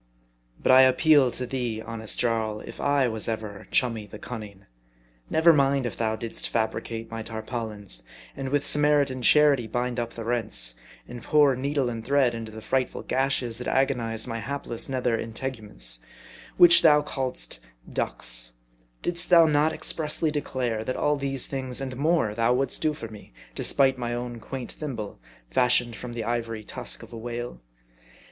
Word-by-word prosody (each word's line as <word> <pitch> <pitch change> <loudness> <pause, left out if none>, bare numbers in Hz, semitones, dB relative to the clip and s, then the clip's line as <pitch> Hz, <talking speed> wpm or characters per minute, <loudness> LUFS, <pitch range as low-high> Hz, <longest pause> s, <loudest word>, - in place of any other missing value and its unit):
But - - +4
I 130 +1 +9
appeal 135 +1 +5
to 125 +1 -2
thee, 120 -3 -3
honest 110 -1 -2
Jarl, 110 -3 0
if - - -10
I 140 -2 +2
was 110 -2 -1
ever 110 -3 -5
chummy 115 -4 +1
the 105 - -10
cunning. 105 -4 -8 0.6
Never 165 +1 +5
mind 140 -2 +2
if 120 - -3
thou 110 -1 -1
didst 115 0 -3
fabricate 115 0 -3
my 115 0 -4
tar 110 0 -6
paulins; 105 - -4 0.3
and 135 -1 -4
with 145 +1 +1
Samaritan 145 -3 +3
charity 140 -2 +5
bind 120 +2 -2
up 115 -1 -4
the 115 - -5
rents, 110 - 0 0.3
and 120 - -8
pour 145 +1 +4
needle 140 +1 -1
and 115 -2 -4
thread 135 -1 +2
into 115 -1 -6
the 110 0 -10
frightful 130 +3 -1
gashes 130 -3 0
that 125 - -5
agonized 120 -5 0
my 115 -2 -4
hapless 135 -2 -3
nether 125 -3 0
integuments, 110 - -3 0.6
which 175 -1 +8
thou 150 -2 +6
calledst 130 - -3 0.2
" - - -17
ducks - - -1 0.2
;" - - -38
Didst 175 0 0
thou 170 -2 +8
not 150 0 +3
expressly 155 0 -1
declare, 125 -6 -2
that 130 - -3
all 150 0 +2
these 135 -2 -1
things, 130 -2 -4
and 130 -1 -5
more, 150 -5 +1
thou 115 +2 +2
wouldst 135 +1 -1
do 155 -1 +1
for 115 - -7
me, 105 - -13 0.2
despite 135 -2 +3
my 120 -1 -2
own 120 -1 -5
quaint 130 +2 -6
thimble, 115 - -6 0.3
fashioned 125 -2 +2
from 120 0 -7
the 115 -1 -4
ivory 115 -1 -3
tusk - - -4
of - - -13
a - - -6
whale 120 - -6
120 Hz, 170 wpm, -26 LUFS, 110-135 Hz, 0.6 s, I